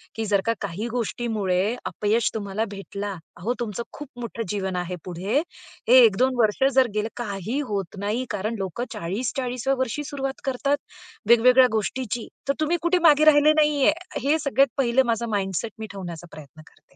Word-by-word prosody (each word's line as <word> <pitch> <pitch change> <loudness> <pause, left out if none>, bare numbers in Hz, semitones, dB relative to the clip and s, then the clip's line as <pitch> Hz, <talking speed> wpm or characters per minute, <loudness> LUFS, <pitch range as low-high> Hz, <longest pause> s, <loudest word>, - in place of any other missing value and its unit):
की 225 -1 -2
जर 200 -2 +2
का 230 - +2
काही 200 +4 -3
गोष्टीमुळे 220 -3 -1
अपयश 215 +3 0
तुम्हाला 210 0 -2
भेटलं, 200 0 -5 0.2
अहो, 220 +9 -1
तुमचं 235 +1 -3
खूप 295 -2 -9
मोठं 230 -1 -4
जीवन 190 -3 -2
आहे 180 0 -3
पुढे. 190 - -1 0.5
हे 255 +1 +9
1-2 250 +5 +2
वर्ष 215 +4 +2
जर 260 -2 +5
गेले, 210 +1 0
काही 215 +3 -3
होत 195 -1 -3
नाही 215 +6 -1
कारण 210 +3 -2
लोकं 195 +6 -3
40-40व्या 245 +7 -2
वर्षी 260 +3 -1
सुरुवात 270 -1 -4
करतात, 275 +2 0 0.5
वेगवेगळ्या 250 +2 +7
गोष्टींची, 225 +1 -2 0.2
तर - - +4
तुम्ही 335 +3 +2
कुठे 350 +1 +2
मागे 300 +1 +5
राहिले 305 0 +6
नाहीये. 295 -1 +4 0.3
हे 295 +5 +1
सगळ्यात 275 -3 +2
पहिलं 260 0 +3
माझा 235 0 -1
माइंडसेट 195 +3 -2
मी 220 - -5
ठेवण्याचा 175 -3 -7
प्रयत्न 155 +1 -12
करते. - - -22
230 Hz, 165 wpm, -24 LUFS, 200-260 Hz, 0.5 s, हे